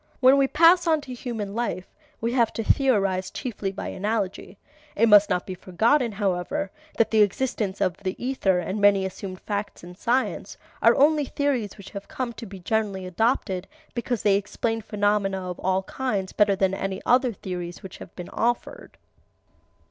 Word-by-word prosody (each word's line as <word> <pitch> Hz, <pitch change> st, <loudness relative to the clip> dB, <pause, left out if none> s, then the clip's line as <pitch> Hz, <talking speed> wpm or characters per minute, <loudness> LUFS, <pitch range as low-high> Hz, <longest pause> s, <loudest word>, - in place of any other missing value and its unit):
When 265 Hz, +1 st, +6 dB
we 275 Hz, -, +4 dB
pass 340 Hz, +4 st, +5 dB
on 320 Hz, -2 st, +4 dB
to 260 Hz, -3 st, -8 dB
human 230 Hz, -5 st, -5 dB
life, 225 Hz, -5 st, -3 dB, 0.3 s
we 230 Hz, +1 st, -1 dB
have 235 Hz, -3 st, +3 dB
to 225 Hz, -, -3 dB
theorize 195 Hz, -9 st, +2 dB
chiefly 210 Hz, -7 st, -4 dB
by 195 Hz, -, -5 dB
analogy. 205 Hz, -1 st, -3 dB, 0.4 s
(It 230 Hz, +3 st, +4 dB
must 205 Hz, -1 st, +7 dB
not 180 Hz, -2 st, 0 dB
be 190 Hz, -, -5 dB
forgotten, 225 Hz, +8 st, +1 dB
however, 195 Hz, -1 st, -1 dB, 0.3 s
that 220 Hz, -1 st, +2 dB
the 220 Hz, -1 st, +5 dB
existence 210 Hz, -2 st, 0 dB
of 185 Hz, -1 st, +1 dB
the 190 Hz, -1 st, -4 dB
ether 245 Hz, -7 st, 0 dB
and 190 Hz, +4 st, -3 dB
many 200 Hz, -1 st, +5 dB
assumed 185 Hz, 0 st, -6 dB
facts 205 Hz, -3 st, -4 dB
in 175 Hz, +1 st, -10 dB
science 240 Hz, +7 st, -1 dB, 0.2 s
are -, -, +6 dB
only 295 Hz, +1 st, +4 dB
theories 265 Hz, -8 st, -1 dB
which 200 Hz, -2 st, -11 dB
have 200 Hz, -1 st, -8 dB
come 250 Hz, -2 st, -4 dB
to 230 Hz, 0 st, -9 dB
be 195 Hz, 0 st, -9 dB
generally 195 Hz, 0 st, -1 dB
adopted 190 Hz, -1 st, 0 dB, 0.3 s
because 240 Hz, -1 st, -2 dB
they 200 Hz, -2 st, +4 dB
explain 225 Hz, +3 st, -2 dB
phenomena 205 Hz, -3 st, 0 dB
of 180 Hz, -, -8 dB
all 190 Hz, +1 st, 0 dB
kinds 200 Hz, -4 st, -3 dB
better 205 Hz, -1 st, +3 dB
than 190 Hz, 0 st, +1 dB
any 195 Hz, 0 st, -3 dB
other 250 Hz, 0 st, +4 dB
theories 180 Hz, -4 st, -6 dB
which 190 Hz, -, -9 dB
have -, -, -11 dB
been 180 Hz, -1 st, -8 dB
offered.) 240 Hz, -, -2 dB
205 Hz, 175 wpm, -25 LUFS, 190-240 Hz, 0.4 s, must